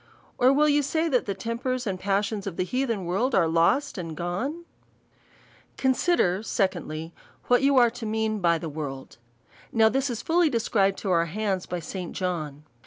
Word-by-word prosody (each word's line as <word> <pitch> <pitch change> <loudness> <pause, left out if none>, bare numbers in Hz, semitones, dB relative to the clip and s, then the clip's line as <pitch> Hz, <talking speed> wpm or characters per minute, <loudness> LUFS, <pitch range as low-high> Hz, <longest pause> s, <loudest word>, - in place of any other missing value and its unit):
^ - - -31 0.4
Or 250 +1 +6
will 295 +2 +4
yon 295 0 +3
say, 315 +4 0
that 250 -6 +1
the 200 - -2
tempers 235 +5 -3
and 190 -3 -3
pas 200 +2 +1
sions 205 -1 -5
of 180 - -5
the - - +1
heathen 230 -1 -2
world 210 +10 0
are 180 -4 +4
lost 170 - +2
and 165 -3 -6
gone? 255 - -3 1.1
Consider, 260 - +2
Secondly, 175 -6 -2 0.4
What 245 +1 +5
yon 275 0 +3
are 240 -2 +6
to 230 -2 -6
mean 220 0 -1
by 170 -3 +3
the 165 - -6
world. 140 -6 -7 0.5
Now 220 -1 +4
this 270 +4 0
is 235 -2 -4
fully 335 0 +3
described 205 -5 +1
to 195 - 0
our 170 -1 +3
hands 190 +1 -2
by 180 -1 -4
St. 180 +2 -6
John. 155 -6 -3
205 Hz, 185 wpm, -26 LUFS, 175-255 Hz, 1.1 s, Or